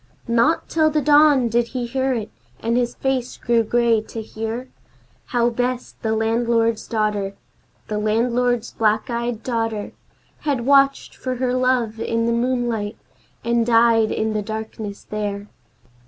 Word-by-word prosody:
Not 235 Hz, +8 st, +2 dB
till 315 Hz, -1 st, +2 dB
the 305 Hz, 0 st, +1 dB
dawn 290 Hz, -3 st, +5 dB
did 235 Hz, +1 st, +1 dB
he 245 Hz, -, -1 dB
hear 265 Hz, +2 st, -1 dB
it, 220 Hz, -3 st, -4 dB, 0.3 s
and 230 Hz, +1 st, 0 dB
his 245 Hz, 0 st, 0 dB
face 260 Hz, -2 st, -2 dB
grew 235 Hz, -1 st, +2 dB
grey 230 Hz, 0 st, +2 dB
to 220 Hz, +1 st, -8 dB
hear 225 Hz, +3 st, -5 dB, 0.6 s
How 240 Hz, -1 st, +1 dB
Bess, 245 Hz, +1 st, -2 dB
the 220 Hz, -1 st, 0 dB
landlord's 230 Hz, 0 st, +1 dB
daughter, 210 Hz, -3 st, -1 dB, 0.5 s
The 210 Hz, -1 st, -2 dB
landlord's 235 Hz, +2 st, +1 dB
black 215 Hz, +2 st, +1 dB
eyed 235 Hz, -1 st, -2 dB
daughter, 225 Hz, -4 st, -2 dB, 0.5 s
Had 275 Hz, -6 st, -1 dB
watched 275 Hz, 0 st, +3 dB
for 255 Hz, -1 st, -3 dB
her 250 Hz, 0 st, -1 dB
love 255 Hz, -3 st, +1 dB
in 230 Hz, 0 st, 0 dB
the 235 Hz, -, +1 dB
moonlight, 235 Hz, -3 st, -1 dB, 0.5 s
and 235 Hz, 0 st, +2 dB
died 230 Hz, -1 st, +4 dB
in 220 Hz, 0 st, -1 dB
the 215 Hz, -, 0 dB
darkness 215 Hz, -1 st, -6 dB
there. 205 Hz, -1 st, -4 dB
235 Hz, 145 wpm, -21 LUFS, 220-250 Hz, 0.6 s, dawn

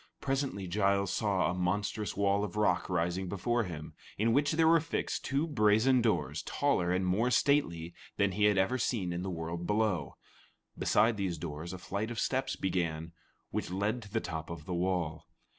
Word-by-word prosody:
Presently 135 Hz, -7 st, -2 dB
Giles 100 Hz, +1 st, +1 dB
saw 100 Hz, -4 st, +1 dB
a -, -, -2 dB
monstrous 100 Hz, +4 st, -1 dB
wall 100 Hz, 0 st, +2 dB
of 105 Hz, -2 st, -4 dB
rock 105 Hz, -4 st, +1 dB
rising 90 Hz, +1 st, -1 dB
before 115 Hz, +5 st, 0 dB
him, 80 Hz, -4 st, -7 dB, 0.2 s
in 115 Hz, +2 st, +2 dB
which 145 Hz, +2 st, +3 dB
were 165 Hz, +1 st, +5 dB
fixed 165 Hz, +2 st, -3 dB
two 140 Hz, +4 st, 0 dB
brazen 120 Hz, -2 st, +3 dB
doors 115 Hz, -2 st, 0 dB
taller 90 Hz, 0 st, 0 dB
and 95 Hz, +1 st, +1 dB
more 105 Hz, +7 st, +2 dB
stately 85 Hz, -, +1 dB, 0.2 s
than 100 Hz, -1 st, +2 dB
he 105 Hz, +2 st, +2 dB
had 105 Hz, -1 st, +4 dB
ever 110 Hz, +7 st, +2 dB
seen 100 Hz, -8 st, -1 dB
in 85 Hz, -, -3 dB
the 95 Hz, -, -3 dB
world 85 Hz, 0 st, -4 dB
below. 105 Hz, -9 st, 0 dB, 0.6 s
Beside 110 Hz, +1 st, +3 dB
these 95 Hz, -4 st, -2 dB
doors, 80 Hz, +1 st, -6 dB
a 95 Hz, -, -6 dB
flight 100 Hz, +4 st, -3 dB
of 120 Hz, -, -6 dB
steps 130 Hz, 0 st, 0 dB
began, 85 Hz, -3 st, -2 dB, 0.4 s
which -, -, -2 dB
led 100 Hz, +6 st, -1 dB
to 105 Hz, -, -11 dB
the 110 Hz, -, +1 dB
top 80 Hz, -4 st, -5 dB
of 85 Hz, -2 st, -7 dB
the 90 Hz, -, -4 dB
wall. 85 Hz, -3 st, -1 dB
100 Hz, 180 wpm, -31 LUFS, 90-110 Hz, 0.6 s, were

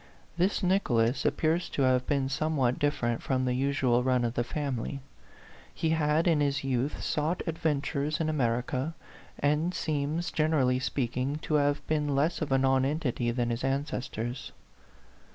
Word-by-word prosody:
This 185 Hz, +4 st, +1 dB
Nicholas 130 Hz, -, +2 dB
appears 165 Hz, +2 st, +1 dB
to 140 Hz, -, 0 dB
have 130 Hz, -1 st, +2 dB
been 140 Hz, -2 st, +1 dB
somewhat 135 Hz, -3 st, 0 dB
dif 145 Hz, 0 st, +1 dB
ferent 120 Hz, -1 st, -1 dB
from 130 Hz, -1 st, 0 dB
the 125 Hz, -, +1 dB
usual 130 Hz, -2 st, +2 dB
run 125 Hz, -1 st, +2 dB
of 115 Hz, -, -1 dB
the 120 Hz, -, 0 dB
family. 140 Hz, 0 st, -3 dB, 0.7 s
He 160 Hz, -, -1 dB
had, 160 Hz, +1 st, +2 dB
in 165 Hz, -3 st, +3 dB
his 140 Hz, -1 st, 0 dB
youth, 135 Hz, +1 st, -1 dB
sought 155 Hz, +4 st, -1 dB
adventures 155 Hz, -2 st, -1 dB
in 160 Hz, -, 0 dB
America, 130 Hz, +1 st, -1 dB, 0.4 s
and 150 Hz, +5 st, +1 dB
seems, 155 Hz, +2 st, -1 dB
generally 145 Hz, -5 st, +2 dB
speaking, 130 Hz, +1 st, -1 dB
to -, -, -3 dB
have 145 Hz, -1 st, +2 dB
been 150 Hz, -2 st, 0 dB
less 155 Hz, +6 st, +1 dB
of 150 Hz, -3 st, -2 dB
a 135 Hz, -, +4 dB
nonentity 135 Hz, -1 st, +1 dB
than 120 Hz, 0 st, 0 dB
his 115 Hz, -, -2 dB
ances 135 Hz, -1 st, -2 dB
tors. 120 Hz, +4 st, -5 dB
140 Hz, 155 wpm, -29 LUFS, 125-155 Hz, 0.7 s, a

